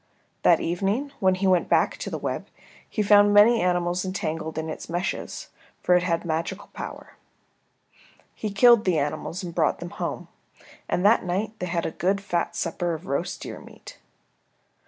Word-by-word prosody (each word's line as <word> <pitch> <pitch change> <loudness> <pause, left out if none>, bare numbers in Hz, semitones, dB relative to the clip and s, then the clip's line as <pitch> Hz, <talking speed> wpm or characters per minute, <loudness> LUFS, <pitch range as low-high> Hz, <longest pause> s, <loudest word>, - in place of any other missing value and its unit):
That - - +5
evening 200 +11 -1
when 190 -1 +3
he 190 +1 -2
went 185 -2 +3
back - - +2
to - - -5
the - - -4
web - - -4 0.4
he 215 - -1
found 205 0 +5
many 225 +3 +6
animals 180 0 0
entangled 165 -4 -4
in 160 0 -2
its 160 - -7
meshes, 175 +2 -4 0.3
for 180 - +3
it 180 - +4
had 175 -1 -1
magical 170 +5 -3
power. - - -8 1.2
He 215 - -4
killed 225 +3 +5
the 180 -4 +2
animals 150 +5 -3
and 175 -2 -6
brought 165 -2 +1
them 175 0 -8
home, - - -4 0.6
and 180 - 0
that 220 +3 +5
night 190 +5 -2
they 180 - -3
had 170 -1 -1
a - - -2
good 190 +5 0
fat 175 -4 -2
supper 170 0 -2
of 165 +4 -10
roast 140 - -3
deer - - -7
meat. - - -13
180 Hz, 175 wpm, -25 LUFS, 170-200 Hz, 1.2 s, many